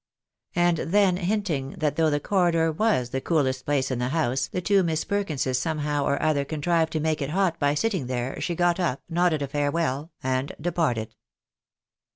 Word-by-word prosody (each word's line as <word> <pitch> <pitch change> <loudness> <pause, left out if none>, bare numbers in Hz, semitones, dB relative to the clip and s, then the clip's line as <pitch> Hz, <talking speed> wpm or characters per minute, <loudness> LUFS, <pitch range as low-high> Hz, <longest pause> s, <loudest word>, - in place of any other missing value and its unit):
And 175 -1 +3
then 185 +2 +2
hinting 175 -8 -1
that 150 -3 -1
though 160 -1 +3
the 145 -1 +1
corridor 170 -2 +2
was 155 - +1
the 135 - -2
coolest 130 -6 0
place 135 -2 +1
in 125 - -1
the 125 +1 -1
house, 135 -3 0
the - - -3
two 195 +2 +3
Miss 160 -3 0
Perkinses 150 -11 -1
somehow 150 0 -1
or 140 - +1
other 155 -2 +1
contrived 160 +3 0
to 160 - 0
toake 155 0 0
it 140 - -2
hot 180 0 0
by 145 0 +2
sitting 190 - -1
there, 125 +1 -3
she 175 - -1
got 175 +1 +2
up, 165 -7 -1
nodded 170 -3 +1
a - - -2
farewell, 145 +1 -1
and 130 +2 -1
departed. 150 -9 -1
155 Hz, 185 wpm, -25 LUFS, 135-175 Hz, -, And